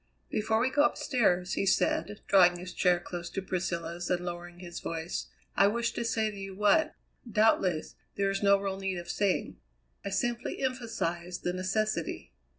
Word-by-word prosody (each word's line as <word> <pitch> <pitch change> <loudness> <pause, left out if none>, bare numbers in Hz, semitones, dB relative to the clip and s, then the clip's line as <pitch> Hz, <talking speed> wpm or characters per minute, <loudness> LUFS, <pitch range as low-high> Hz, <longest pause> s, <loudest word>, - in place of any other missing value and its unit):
"Before 220 +1 +1
we 255 +3 +2
go 290 - +3
upstairs," 205 -12 +1
he 195 - 0
said, 205 +2 +1
drawing 180 -3 +6
his 180 +1 -8
chair 180 -1 +3
close 175 0 -6
to - - -3
Priscilla's 175 -2 -3
and 180 -1 0
lowering 175 0 -6
his 175 -1 -7
voice, 165 +1 -4 0.3
"I 200 - +6
wish 235 +3 0
to - - -3
say 220 -2 0
to 205 - -10
you 195 -1 -6
what, 300 +11 +3 0.4
doubtless, 200 -7 +2 0.2
there 195 0 +1
is 195 - -2
no 200 -1 +5
real 195 -1 -3
need 190 -1 -2
of 175 0 -5
saying. 200 -3 0 0.5
I - - -3
simply 235 +5 -1
emphasize 225 -9 -2
the 180 - -1
necessity. 185 - -1
195 Hz, 170 wpm, -30 LUFS, 175-215 Hz, 0.5 s, drawing